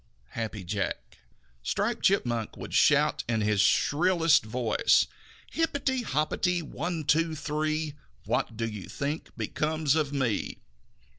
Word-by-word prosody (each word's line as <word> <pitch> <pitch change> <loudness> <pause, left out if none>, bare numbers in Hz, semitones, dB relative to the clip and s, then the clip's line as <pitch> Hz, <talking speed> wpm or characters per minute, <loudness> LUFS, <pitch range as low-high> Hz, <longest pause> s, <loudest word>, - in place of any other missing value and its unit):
Happy 110 -3 -5
Jack. 100 +2 -4 0.4
Striped 65 - -1
Chipmunk 120 - +1
would - - -8
shout - - +4
in 110 -2 +1
his 105 -1 +2
shrillest 165 - +3
voice: 110 0 +2 0.5
"Hipperty, 280 -5 0
hopperty, 175 - 0
one, 165 +2 -4
two, 160 +2 +2
three! 155 +1 -2 0.3
What 110 - -1
do 115 -1 -1
you 105 -3 -7
think 145 +3 -3
becomes 155 -2 0
of 155 -3 0
me?" 130 -7 -1
150 Hz, 120 wpm, -28 LUFS, 115-160 Hz, 0.5 s, shout